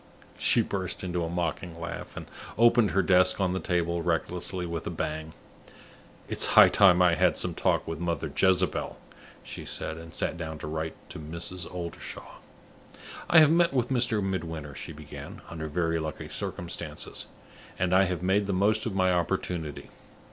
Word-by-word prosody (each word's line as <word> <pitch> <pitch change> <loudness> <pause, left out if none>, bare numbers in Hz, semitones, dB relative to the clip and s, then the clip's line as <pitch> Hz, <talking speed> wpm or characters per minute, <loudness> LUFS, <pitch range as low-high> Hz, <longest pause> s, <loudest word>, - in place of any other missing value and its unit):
She 115 - +4
burst 95 -4 -3
into 90 -1 -2
a 80 - -3
mocking 85 0 -3
laugh, 85 - -6
and - - -6 0.3
opened 120 -1 +5
her 95 +2 +2
desk 90 +1 +4
on 95 -2 +1
the 95 - -1
table 85 -2 0
recklessly 90 +2 -2
with 85 -1 -4
a - - -1
bang. 80 +1 -4 0.9
"It's - - +3
high - - +10
time 90 -3 +6
I 90 -1 +5
had 85 - +3
some - - 0
talk - - 0
with 80 -1 -4
Mother 85 -3 -2
Jezebel," 95 -1 +1 0.5
she - - -7
said, 80 0 -5
and 80 0 -10
sat 85 - -2
down 80 -2 -5
to 75 - -7
write 80 +1 -3 0.2
to - - -7
Mrs. 85 +4 -6
Oldershaw. 85 -2 -7 0.9
"I 165 - +6
have 155 -1 +6
met 170 -3 +3
with 125 -2 +1
Mr. 120 -5 +1
Midwinter," 80 -6 -4
she 80 - -7
began, 75 -1 -10
"under 80 -2 -5
very 80 +1 0
lucky 80 -1 -5
circumstances; 85 -1 -5 0.5
and 90 0 0
I 95 +1 +6
have 90 -2 -3
made 100 +2 +2
the 100 - 0
most 105 +4 +2
of 105 - -4
my 95 -1 +3
opportunity. 85 -3 -2
90 Hz, 170 wpm, -28 LUFS, 80-95 Hz, 0.9 s, high